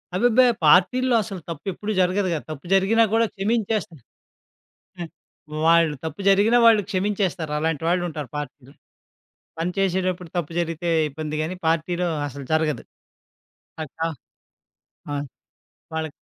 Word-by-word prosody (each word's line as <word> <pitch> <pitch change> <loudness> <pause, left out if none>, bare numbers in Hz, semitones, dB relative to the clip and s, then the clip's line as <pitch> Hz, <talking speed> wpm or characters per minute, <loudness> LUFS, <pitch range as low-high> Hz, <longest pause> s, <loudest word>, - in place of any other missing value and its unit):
అబ్బెబ్బే! 245 +5 +4 0.2
పార్టీల్లో 245 +11 +4
అసలు 195 -3 -7
తప్పెప్పుడు 195 +6 -4
జరగదు 185 +2 +2
కదా! 155 - -2
తప్పు 155 -1 -8
జరిగినా 200 +4 +4
కూడా 230 +1 +4
క్షమించేస్తా. 210 -3 -1 1.0
హ్మ్. 170 -2 -6 0.6
వాళ్ళు 165 -2 +4
తప్పు 160 +5 -5
జరిగిన 205 +5 +4
వాళ్ళు 225 -2 +6
క్షమించేస్తారు. 190 -5 -1
అలాంటి 160 -1 -1
వాళ్ళుంటారు 170 -6 -2
పార్టీలో. 140 -1 -8 0.9
పని 175 +2 -1
చేసేటప్పుడు 185 -2 0
తప్పు 170 -2 -2
జరిగితే 170 0 -2 0.2
ఇబ్బందిగానీ. 155 +4 -4
పార్టీలో 170 +2 0 0.2
అసలు 140 -1 -8
జరగదు 155 -5 0 1.0
అక్కడ 155 +2 -12 1.1
ఆ! - - -2 0.8
వాళ్ళకి 160 -2 -3
175 Hz, 110 wpm, -23 LUFS, 155-200 Hz, 1.1 s, వాళ్ళు